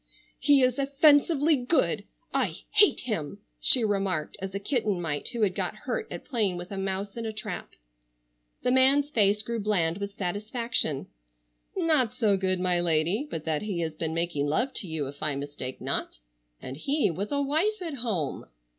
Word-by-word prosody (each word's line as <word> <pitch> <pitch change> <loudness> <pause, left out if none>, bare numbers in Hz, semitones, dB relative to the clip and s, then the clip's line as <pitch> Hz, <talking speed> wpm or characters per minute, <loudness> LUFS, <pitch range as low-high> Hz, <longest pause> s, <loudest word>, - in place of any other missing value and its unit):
"He 285 -3 +5
is 255 +1 +2
offensively 290 +2 +4
good. 255 +5 +1 0.3
I - - 0 0.2
hate 415 -1 +5
him!" 200 - -3 0.2
she 250 - +5
remarked 195 -7 -1
as 190 0 -5
a - - -1
kitten 210 -3 -1
might 155 -4 -3
who 235 -2 -1
had 195 -3 +2
got - - -2
hurt 445 -3 -2
at - - -7
playing 210 -9 0
with 175 +2 -8
a - - -4
mouse 195 +1 -3
in 230 -1 -3
a - - -2
trap. 215 -4 -7 0.9
The 250 - +2
man's 275 +3 +4
face 210 -2 +3
grew 235 +1 -3
bland 190 -5 0
with 200 0 -6
satisfaction. 205 - -1 0.7
"Not 310 - +2
so 210 -4 +2
good, 185 -1 +1
my 180 -1 +2
lady, 175 - +1
but 160 -1 -5
that 155 -2 0
he 200 -5 -3
has 160 -2 -2
been 160 +1 -3
making 165 -4 -1
love 245 - 0
to 195 - -5
you, 160 -3 -2
if 140 +1 -9
I 150 -2 +1
mistake 140 -2 -6
not, - - -1 0.4
and 130 +1 -7
he 275 - +1
with 200 - -4
a 285 0 +1
wife 340 +10 +1
at 320 -5 -5
home." 200 - -2
205 Hz, 180 wpm, -27 LUFS, 170-260 Hz, 0.9 s, He